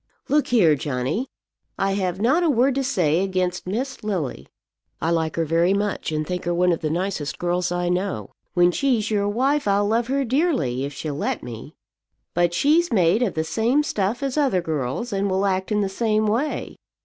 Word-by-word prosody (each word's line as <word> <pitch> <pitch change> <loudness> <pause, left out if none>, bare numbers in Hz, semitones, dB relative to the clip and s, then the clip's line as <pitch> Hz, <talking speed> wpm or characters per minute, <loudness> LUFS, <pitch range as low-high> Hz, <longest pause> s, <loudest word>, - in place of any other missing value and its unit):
"Look 295 +1 +2
here, 195 -11 +4
Johnny. 145 - -2 0.5
I 195 0 +1
have 190 -2 -1
not 265 - +3
a 340 - +2
word 265 0 +3
to 270 +1 -1
say 175 - +1
against 185 -2 -2
Miss 255 +7 -3
Lily. 185 -11 -3 0.5
I 165 - 0
like 160 -1 0
her 165 - 0
very 170 +4 +2
much, 205 -4 -2
and 155 0 -1
think 180 0 -4
her 175 0 0
one 180 +1 +3
of 170 - 0
the 155 - -1
nicest 170 -3 -2
girls 175 0 -1
I 175 0 -1
know. 180 - -2 0.2
When 175 0 +5
she's 235 0 0
your 205 -1 +1
wife, 270 +5 +1
I'll 200 +1 +2
love 230 +2 +1
her 275 +1 0
dearly, 235 - 0
if 140 - -5
she'll 150 +1 -4
let 140 - -2
me. 120 +5 -9 0.6
But 175 0 +1
she's 315 - +3
made 190 0 +3
of 235 -6 0
the 160 - 0
same 235 - +1
stuff 210 -1 -1
as 275 +1 -2
other 265 -11 +2
girls, 160 - -3
and 195 0 0
will 190 +1 +1
act 190 +1 -1
in 210 0 +2
the 200 - +1
same 215 +2 0
way. 235 +8 -1
195 Hz, 200 wpm, -23 LUFS, 170-235 Hz, 0.6 s, When